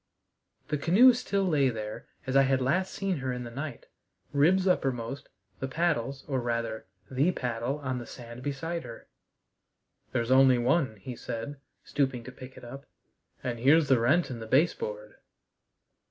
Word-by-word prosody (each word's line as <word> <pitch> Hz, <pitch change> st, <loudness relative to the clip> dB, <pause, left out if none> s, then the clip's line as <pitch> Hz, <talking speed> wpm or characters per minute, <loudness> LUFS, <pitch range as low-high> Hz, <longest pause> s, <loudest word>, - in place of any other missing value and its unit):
The 150 Hz, -2 st, -1 dB
canoe 215 Hz, -, +7 dB
still 200 Hz, -5 st, -1 dB
lay 145 Hz, -7 st, +3 dB
there 110 Hz, -2 st, -6 dB, 0.2 s
as 130 Hz, 0 st, -2 dB
I 135 Hz, -, +7 dB
had 135 Hz, -1 st, +2 dB
last 175 Hz, +9 st, +1 dB
seen 195 Hz, -3 st, -2 dB
her 135 Hz, -2 st, -2 dB
in 125 Hz, 0 st, -4 dB
the 120 Hz, -, -8 dB
night, 140 Hz, 0 st, -6 dB, 0.5 s
ribs 180 Hz, +7 st, +4 dB
uppermost, 135 Hz, -5 st, -1 dB, 0.3 s
the 135 Hz, -, -2 dB
paddles, 140 Hz, -4 st, -1 dB
or 135 Hz, -3 st, 0 dB
rather, 115 Hz, -3 st, -3 dB, 0.2 s
the 140 Hz, +7 st, +2 dB
paddle, 120 Hz, +2 st, -2 dB
on 130 Hz, -3 st, -3 dB
the 120 Hz, -, -8 dB
sand 120 Hz, 0 st, -10 dB
beside 165 Hz, +5 st, -3 dB
her. 115 Hz, -2 st, -10 dB, 1.1 s
"There's 120 Hz, +1 st, -1 dB
only 130 Hz, -1 st, +6 dB
one," 130 Hz, 0 st, +1 dB
he 120 Hz, +5 st, -8 dB
said, 115 Hz, +5 st, -5 dB, 0.3 s
stooping 130 Hz, -4 st, -1 dB
to 130 Hz, -, -9 dB
pick 130 Hz, 0 st, -12 dB
it -, -, -12 dB
up. 135 Hz, +3 st, -9 dB, 0.6 s
"And 120 Hz, -2 st, -3 dB
here's 145 Hz, +4 st, +5 dB
the 130 Hz, -3 st, +5 dB
rent 140 Hz, +7 st, +2 dB
in 120 Hz, -, -5 dB
the 110 Hz, -, -7 dB
base 145 Hz, +9 st, +4 dB
board." 105 Hz, 0 st, -7 dB
130 Hz, 170 wpm, -29 LUFS, 120-150 Hz, 1.1 s, canoe